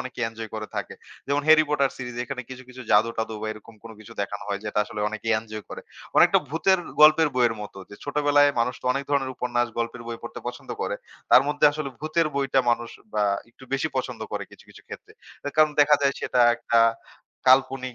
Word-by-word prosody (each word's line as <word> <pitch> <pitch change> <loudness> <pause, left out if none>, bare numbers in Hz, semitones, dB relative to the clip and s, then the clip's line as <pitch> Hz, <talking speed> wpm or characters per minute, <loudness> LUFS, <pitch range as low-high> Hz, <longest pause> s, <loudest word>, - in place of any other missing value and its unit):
অনেকে 130 0 -8
এনজয় 115 -1 -8
করে 110 -1 -4
থাকে। - - -4 0.3
যেমন 140 +1 0
"হ্যারি 155 0 +7
পটার 140 -2 +2
সিরিজ" 125 -2 -7
এখানে 125 0 -5
কিছু, 130 0 -8
কিছু 130 0 -10
জাদু-টাদু 110 +1 +2
বা - - -2
এরকম 110 +1 -14
কোন 115 - -10
কিছু 110 - -12
দেখানো 100 0 -4
হয়, 100 0 -2
যেটা 105 0 -2
আসলে 105 -1 -7
অনেকেই 110 +1 -2
এনজয় 110 -1 -8
করে। - - -7 0.4
অনেকটা - - +6
ভূতের 180 +5 +2 0.2
গল্পের 155 +1 +7
বইয়ের 120 -3 +3
মতো 100 -1 -9
যে, - - -9
ছোটবেলায় 145 0 +3
মানুষ 125 +1 0
তো - - -21
অনেক 140 +2 -3
ধরনের 135 -2 +1
উপন্যাস, 120 0 0
গল্পের 115 +1 -3
বই 115 -1 -5
পড়তে - - -8
পছন্দ - - -9
করে। - - -2 0.3
তার 130 - +8
মধ্যে 145 0 0
আসলে 150 -1 -4
ভূতের 155 +2 +1
বইটা 135 -1 +2
মানুষ 120 0 -1 0.3
বা 105 - +2 0.3
একটু 125 - -16
বেশি 135 +3 0
পছন্দ 130 - -3
করে - - -3
কিছু, - - -17
কিছু - - -16
ক্ষেত্রে। - - -10 0.3
অ্যা 145 - -4
কারণ 155 0 +5
দেখা 150 +1 +6
যায় 140 0 +3
সেটা 125 - 0 0.2
একটা 115 0 +1 0.7
কাল্পনিক 130 -1 +3
125 Hz, 205 wpm, -25 LUFS, 115-145 Hz, 0.7 s, তার